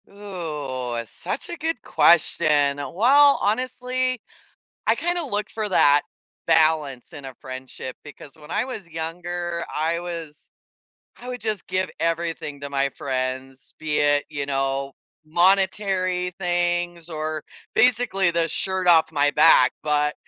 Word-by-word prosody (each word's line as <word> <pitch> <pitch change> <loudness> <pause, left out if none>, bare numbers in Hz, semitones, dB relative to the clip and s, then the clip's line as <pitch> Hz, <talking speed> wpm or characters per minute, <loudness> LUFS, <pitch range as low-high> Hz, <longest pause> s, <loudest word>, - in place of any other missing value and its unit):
Ooh, 150 -11 -5
such 220 - -6
a 345 - -5
good 320 -7 -3
question. 150 -3 +3
Well, 265 - +4
honestly, 255 +3 -1 0.7
I - - +4
kinda 345 0 -1
look 210 -7 -1
for 215 -2 -3
that 145 -5 +5 0.5
balance 155 -4 +2
in 145 -3 -9
a 130 -1 -9
friendship 130 0 -7
because 145 -1 -12
when 150 +1 -13
I - - 0
was 220 -8 -7
younger, 170 +1 -4
I 165 +2 0
was 165 -4 -7 0.7
I 245 - -11
would 250 -1 -5
just 215 -4 -2
give 185 0 -1
everything 165 -3 -2
to 140 0 -6
my 140 0 +1
friends, 130 0 -4
be 155 -1 -1
it, 145 0 +3
you 140 -1 -4
know, 135 0 -1 0.3
monetary 185 +1 +1
things 175 -1 -1
or 155 -1 -4 0.3
basically 220 -6 +3
the 170 -1 +2
shirt 185 +3 0
off 160 -2 +5
my 145 -1 +3
back, 155 +3 +6
but 150 -1 +1
165 Hz, 135 wpm, -23 LUFS, 145-195 Hz, 0.7 s, back